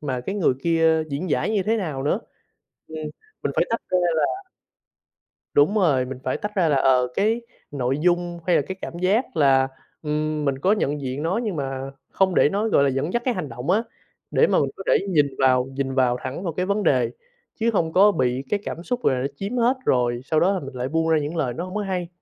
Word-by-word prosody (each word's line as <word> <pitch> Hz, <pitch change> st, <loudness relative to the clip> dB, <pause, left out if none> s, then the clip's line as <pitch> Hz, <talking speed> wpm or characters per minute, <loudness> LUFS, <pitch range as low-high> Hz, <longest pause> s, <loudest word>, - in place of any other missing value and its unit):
mà 130 Hz, -4 st, -3 dB
cái 195 Hz, +11 st, -4 dB
người 185 Hz, -10 st, +2 dB
kia 165 Hz, -1 st, +3 dB
diễn 150 Hz, +4 st, -3 dB
giải -, -, +1 dB
như 210 Hz, -3 st, +1 dB
thế 225 Hz, +4 st, +1 dB
nào 155 Hz, -10 st, -3 dB
nữa. 145 Hz, -, 0 dB, 0.7 s
Ừm, 160 Hz, -, -8 dB, 0.5 s
mình -, -, 0 dB
phải -, -, +3 dB
tách 230 Hz, -, -1 dB
ra 185 Hz, -, +4 dB, 0.2 s
là 385 Hz, -, 0 dB, 1.1 s
Đúng 145 Hz, +9 st, +4 dB
rồi, 145 Hz, -11 st, +3 dB
mình 130 Hz, 0 st, -7 dB
phải 130 Hz, -, -1 dB
tách 210 Hz, +1 st, -5 dB
ra 175 Hz, -4 st, +3 dB
là, 145 Hz, -, +3 dB
ờ, 130 Hz, -2 st, +3 dB
cái 225 Hz, +4 st, +1 dB, 0.3 s
nội 135 Hz, -1 st, -1 dB
dung 175 Hz, 0 st, +1 dB
hay 175 Hz, -, +4 dB
là -, -, +4 dB
cái 190 Hz, 0 st, -5 dB
cảm 170 Hz, -, -6 dB
giác 200 Hz, +4 st, +1 dB
là, 135 Hz, -2 st, +4 dB, 0.3 s
ừm, 150 Hz, 0 st, -1 dB
mình 135 Hz, -1 st, 0 dB
có 190 Hz, +7 st, +2 dB
nhận 150 Hz, -8 st, 0 dB
diện 135 Hz, +3 st, -4 dB
nó 180 Hz, +6 st, 0 dB
nhưng 205 Hz, -6 st, -2 dB
mà 135 Hz, -1 st, -4 dB, 0.2 s
không 190 Hz, -2 st, +1 dB
để -, -, +5 dB
nó, 210 Hz, +3 st, 0 dB
gọi 140 Hz, -, +3 dB
là, 140 Hz, -, +3 dB
dẫn 135 Hz, +6 st, -2 dB
dắt 240 Hz, -, +1 dB
cái 255 Hz, -, +2 dB
hành 160 Hz, -, -4 dB
động 125 Hz, +6 st, -6 dB
á, 220 Hz, +4 st, +2 dB, 0.5 s
để -, -, +4 dB
mà -, -, +3 dB
mình -, -, +1 dB
có -, -, -8 dB
thể 485 Hz, -, +2 dB
nhìn 150 Hz, -5 st, +3 dB
vào, 130 Hz, -1 st, +4 dB
nhìn 135 Hz, 0 st, -3 dB
vào 125 Hz, -2 st, +2 dB
thẳng 130 Hz, +8 st, -5 dB
vào 170 Hz, -4 st, -3 dB
cái 180 Hz, +2 st, -1 dB
vấn 200 Hz, +1 st, 0 dB
đề 130 Hz, -6 st, +2 dB, 0.5 s
chứ 230 Hz, +1 st, +2 dB
không 165 Hz, -6 st, 0 dB
có 205 Hz, +2 st, +6 dB
bị 130 Hz, -3 st, 0 dB
cái 205 Hz, -, +1 dB
cảm 170 Hz, -, -6 dB
xúc 245 Hz, +2 st, -2 dB
gọi -, -, +3 dB
là 125 Hz, -, -2 dB
nó 135 Hz, -, 0 dB
chiếm 205 Hz, +6 st, -4 dB
hết 245 Hz, +3 st, +3 dB
rồi 120 Hz, -1 st, +1 dB
sau 155 Hz, +2 st, +2 dB
đó 190 Hz, +3 st, +3 dB
là 190 Hz, -, -1 dB
mình 135 Hz, -2 st, -9 dB
lại 125 Hz, +1 st, -2 dB
buông 165 Hz, +1 st, 0 dB
ra 160 Hz, -, +4 dB
những 150 Hz, +3 st, -4 dB
lời 130 Hz, -7 st, -1 dB
nó 170 Hz, +8 st, -4 dB
không 185 Hz, -, -8 dB
có 210 Hz, -, 0 dB
hay. 185 Hz, -3 st, -2 dB
160 Hz, 250 wpm, -23 LUFS, 135-195 Hz, 1.1 s, có